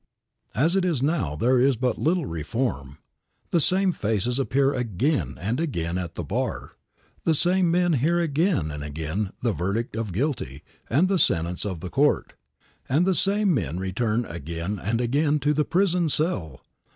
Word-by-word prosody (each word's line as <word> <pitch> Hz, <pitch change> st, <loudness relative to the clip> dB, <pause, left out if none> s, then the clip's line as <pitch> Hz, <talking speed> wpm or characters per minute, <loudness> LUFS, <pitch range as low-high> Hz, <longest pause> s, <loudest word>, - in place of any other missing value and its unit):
As 160 Hz, +7 st, +2 dB
it 195 Hz, -, +2 dB
is 165 Hz, -8 st, 0 dB
now, 140 Hz, -, 0 dB
there 125 Hz, +10 st, +2 dB
is 135 Hz, 0 st, +4 dB
but 125 Hz, +1 st, 0 dB
little 170 Hz, 0 st, +1 dB
reform. 80 Hz, -, -3 dB, 0.5 s
The 170 Hz, -, +3 dB
same 185 Hz, +4 st, +3 dB
faces 115 Hz, -, -1 dB
appear 135 Hz, +1 st, +2 dB
again 125 Hz, -, -1 dB
and 110 Hz, -, -2 dB
again 85 Hz, -, -2 dB
at 85 Hz, -2 st, -6 dB
the 85 Hz, -, -4 dB
bar; 70 Hz, -, -3 dB, 0.5 s
the 160 Hz, -, +2 dB
same 180 Hz, +3 st, +3 dB
men 175 Hz, 0 st, +2 dB
hear 160 Hz, +6 st, +2 dB
again 160 Hz, -, +1 dB
and 75 Hz, 0 st, -6 dB
again 80 Hz, +7 st, -3 dB
the 115 Hz, -3 st, +1 dB
verdict 100 Hz, +7 st, -2 dB
of 110 Hz, -3 st, -3 dB
guilty 95 Hz, -, -3 dB, 0.3 s
and 155 Hz, +10 st, +3 dB
the 190 Hz, -1 st, +1 dB
sentence 85 Hz, -, +2 dB
of 90 Hz, -5 st, -5 dB
the 90 Hz, -, -5 dB
court, -, -, +1 dB, 0.6 s
and 150 Hz, +7 st, +3 dB
the 190 Hz, -, +3 dB
same 200 Hz, +1 st, +2 dB
men 90 Hz, -, -2 dB
return 105 Hz, +5 st, -1 dB
again 85 Hz, +4 st, -5 dB
and 110 Hz, +4 st, 0 dB
again 145 Hz, +5 st, +1 dB
to 150 Hz, +2 st, +2 dB
the 150 Hz, 0 st, +1 dB
prison 180 Hz, -2 st, +2 dB
cell. 100 Hz, -, 0 dB
125 Hz, 170 wpm, -25 LUFS, -, 0.6 s, is